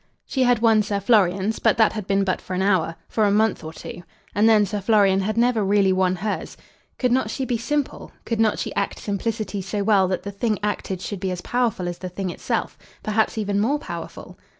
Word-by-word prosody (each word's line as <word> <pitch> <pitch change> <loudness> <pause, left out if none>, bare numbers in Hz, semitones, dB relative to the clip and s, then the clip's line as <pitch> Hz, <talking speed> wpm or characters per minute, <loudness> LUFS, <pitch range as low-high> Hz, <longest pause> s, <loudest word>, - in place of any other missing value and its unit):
She 265 - -2
had 245 -2 +3
won 220 -2 +5
Sir 205 -1 -2
Florian's, 200 0 +2
but - - +2
that 220 -2 +4
had 215 -3 -5
been 195 0 +2
but 185 -1 -1
for 185 - -5
an 185 - 0
hour, 185 -4 +1
for 220 - +1
a - - +3
month 215 +1 +2
or 160 - -6
two. 160 - -9 0.3
And 215 +3 +4
then 215 -2 +5
Sir 205 +1 -4
Florian 200 -2 +4
had 215 +3 -2
never 235 -2 +3
really 195 -1 +3
won 185 0 +2
hers. 205 +3 -4 0.4
Could 250 -2 +1
not 250 -3 +1
she 265 +4 -3
be 245 -3 -1
simple? 290 +4 -3
Could 230 -1 -2
not 220 -1 +3
she - - -4
act 200 - -2
simplicity 210 0 -3
so 200 +2 -3
well 200 -3 +4
that 185 0 -2
the 200 - -5
thing 215 +2 -1
acted 195 -3 -2
should 200 0 -5
be 190 0 -2
as 180 -1 -4
powerful 235 -7 -1
as 175 0 -5
the 185 - -5
thing 185 0 -4
itself; - - -3 0.2
perhaps 215 +1 0
even 205 -2 0
more 255 +8 +2
powerful? - - -8
205 Hz, 225 wpm, -23 LUFS, 190-225 Hz, 0.4 s, won